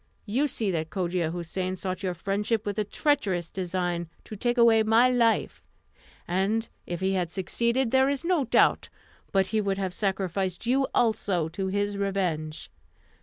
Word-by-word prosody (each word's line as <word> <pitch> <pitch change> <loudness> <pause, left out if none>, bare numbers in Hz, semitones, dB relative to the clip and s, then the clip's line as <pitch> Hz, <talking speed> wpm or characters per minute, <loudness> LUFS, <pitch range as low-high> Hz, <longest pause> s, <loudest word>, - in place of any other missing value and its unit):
You 250 +8 +1
see 220 -7 -1
that 160 -2 -2
Cogia 180 -3 -1
Houssain 180 +2 -3
sought 185 0 -4
your 185 -2 -2
friendship 205 +5 -1
with 205 0 -2
a - - +2
treacherous 200 - 0
design 175 -2 -2
to 215 - -9
take 240 +4 -1
away 230 -2 +6
my 225 +3 +4
life; 235 -2 +1 0.7
and 195 +6 0 0.2
if 175 0 -4
he 190 0 +1
had 180 -3 0
succeeded, 235 +7 0
there 265 +1 +4
is 280 +2 -2
no 340 -6 +2
doubt 240 - +3 0.4
but 195 -1 +3
he 215 - +3
would 195 -1 -1
have 190 -2 -2
sacrificed 190 -1 -2
you 265 +3 +2
also 200 -8 +1
to 190 +4 -3
his 205 +1 -1
revenge. 175 - -2
195 Hz, 165 wpm, -27 LUFS, 180-225 Hz, 0.7 s, away